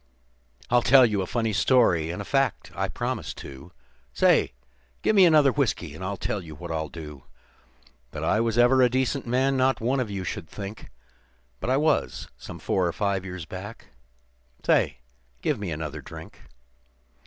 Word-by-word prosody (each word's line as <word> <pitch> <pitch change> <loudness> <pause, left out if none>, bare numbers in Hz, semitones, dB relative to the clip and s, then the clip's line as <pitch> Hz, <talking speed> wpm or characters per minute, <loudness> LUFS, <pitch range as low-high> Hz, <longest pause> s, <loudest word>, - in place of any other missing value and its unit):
"I'll 120 0 +5
tell 130 +2 +7
you 105 -4 0
a 95 - -3
funny 115 0 -1
story, 90 -8 +3
and 85 - -4
a - - -14
fact, 135 -1 0
I - - -1
promise, - - -4
too. 70 +5 -11 0.4
Say! - - +3 0.5
Give 215 - +2
me 195 -2 +8
another 150 -4 +5
whiskey, 110 - -1
and 80 - -9
I'll 100 +1 -3
tell 105 - -2
what 85 0 -9
I'll 80 -1 -2
do 75 -5 -10 0.8
That - - -6
I 110 - +2
was 115 0 0
ever 125 +2 +5
a 125 - +5
decent 130 +1 -1
man 130 +3 +2
not 130 -1 +2
one 125 +4 0
of 125 -4 -2
you 95 -2 -4
would 80 - -9
think; 100 +1 -8 0.7
But - - -3
I 130 - +3
was, 155 +1 0
some - - -10
four 95 -2 0
or 85 - -2
five 100 -2 -1
years 90 -3 -7
back. 95 +7 -9 0.8
Say, - - +2 0.5
give 145 -7 0
me 100 -3 -4
another 75 -2 -5
drink. - - -12
105 Hz, 175 wpm, -26 LUFS, 85-130 Hz, 0.8 s, me